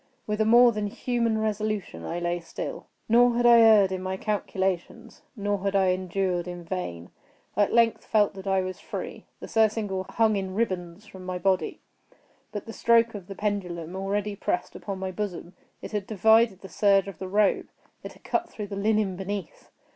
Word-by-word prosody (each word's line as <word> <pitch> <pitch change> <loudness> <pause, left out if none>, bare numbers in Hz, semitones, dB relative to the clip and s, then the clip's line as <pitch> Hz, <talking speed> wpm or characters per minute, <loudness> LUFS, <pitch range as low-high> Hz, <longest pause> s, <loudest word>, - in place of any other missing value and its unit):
With 210 0 -1
a - - +3
more 240 +2 +7
than 210 -2 -2
human 230 +1 -1
resolution 215 - -2
I 170 - -4
lay 175 0 -1
still. 165 - -7 0.2
Nor 240 +1 +5
had 240 0 +1
I 235 -1 +8
erred 215 -4 +6
in 185 -1 -3
my 190 0 -3
calculations—nor 200 +1 -3
had 200 +1 -2
I 190 -1 +4
endured 185 -1 -1
in 175 -1 -7
vain. 165 - -5 0.4
I 205 +1 +4
at - - -7
length 230 -1 +3
felt 210 -2 +2
that 195 0 -9
I 190 -1 +2
was 185 0 -5
free. - - -7
The - - -7
surcingle 215 -4 +1
hung 220 -2 +2
in 190 -1 -4
ribands 185 -3 -2
from 190 -3 -12
my 185 0 -4
body. 185 0 0 0.7
But 205 - -5
the 225 - -8
stroke 230 0 +3
of 195 -4 -8
the 195 - -7
pendulum 180 -5 -3
already 200 +2 -2
pressed 180 - -2
upon 195 -2 -5
my 190 0 -4
bosom. 185 -2 -5 0.3
It - - -7
had 210 -2 -3
divided 220 -1 +4
the 190 - -9
serge 195 +1 +3
of 195 -5 -8
the 190 - -5
robe. 205 0 +2 0.4
It - - -8
had - - -22
cut 345 0 -1
through 210 -2 -7
the 200 - -5
linen 210 -1 +1
beneath. 195 -1 -6
200 Hz, 190 wpm, -26 LUFS, 185-215 Hz, 0.7 s, I